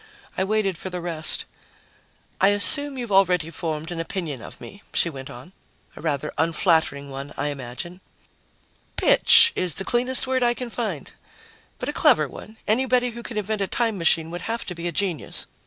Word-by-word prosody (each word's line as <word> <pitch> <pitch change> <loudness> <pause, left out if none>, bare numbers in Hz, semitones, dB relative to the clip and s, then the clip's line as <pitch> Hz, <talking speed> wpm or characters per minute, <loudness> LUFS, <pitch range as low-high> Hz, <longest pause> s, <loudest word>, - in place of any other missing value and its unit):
I 190 - 0
waited 195 -3 0
for 190 - -6
the 180 -1 -5
rest. 165 -2 +2 1.0
"I 195 - +6
assume 270 +8 +3
you've 240 -4 -5
already 180 -4 +3
formed 160 0 -4
an 170 - -4
opinion 165 - -4
of - - -11
me," 200 - -11
she 170 - +2
went 135 -2 -8
on. 125 +8 -11 0.4
"A - - -10
rather 150 -2 -2
unflattering 160 -3 +1
one, 135 +1 -7
I 145 - -1
imagine." 145 +7 -7 0.9
"'Bitch' 465 -2 +6
is 180 -5 -1
the 195 - +3
cleanest 250 +2 +1
word 260 0 0
I 240 0 +2
can 245 -1 -5
find. 205 - -4 0.7
But - - -5
a - - -2
clever - - +4
one. 220 +1 -12
Anybody 250 +2 +2
who 235 +1 -8
can 235 -2 -6
invent 210 0 -2
a 195 - 0
time 225 -3 -1
machine 165 -1 +1
would 175 0 -5
have 230 +1 -2
to 180 - -5
be 170 0 -5
a - - -2
genius." 180 -1 -2
185 Hz, 185 wpm, -24 LUFS, 160-225 Hz, 1.0 s, I